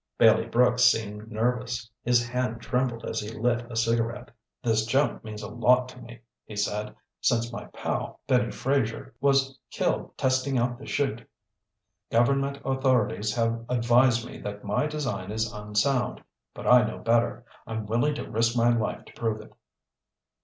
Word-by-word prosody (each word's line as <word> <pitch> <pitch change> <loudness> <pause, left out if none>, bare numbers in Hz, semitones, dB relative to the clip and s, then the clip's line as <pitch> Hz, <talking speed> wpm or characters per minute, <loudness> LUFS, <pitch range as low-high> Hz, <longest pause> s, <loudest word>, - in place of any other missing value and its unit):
Bailey - - +5
Brooks 125 +1 +3
seemed 110 -2 +1
nervous. 120 +1 -1
His 120 0 +2
hand 125 -2 -2
trembled 125 0 -1
as - - -2
he 105 +1 -6
lit 120 +1 0
a - - -6
cigarette. 115 +2 0 0.3
"This 110 -2 +2
jump 135 +5 +1
means 110 -1 -7
a - - -4
lot 125 +3 +3
to 125 - -12
me," 120 0 -12 0.2
he 105 - -10
said. 105 +1 -2 0.3
"Since 120 0 +1
my - - -6
pal, - - -4
Benny 125 -4 +2
Fraser, 130 -5 -1
was 135 -1 +2
killed - - -2
testing 130 +1 +1
out 120 0 0
the 140 - -10
'chute, 120 -5 -2 0.8
government 135 +4 +2
authorities 130 -5 +1
have 115 -1 0
advised 120 0 +3
me - - -9
that 105 0 -6
my 105 +8 0
design 125 -12 -3
is 110 +1 -2
unsound. 105 +4 0 0.3
But - - -8
I 125 -1 +7
know 110 - -3
better. 120 0 +1 0.2
I'm 110 -1 -4
willing 120 +8 +1
to - - -5
risk 115 +2 +1
my 120 0 +4
life 110 -2 -2
to - - -15
prove 110 -2 -2
it." 110 - -13
120 Hz, 160 wpm, -27 LUFS, 110-125 Hz, 0.8 s, I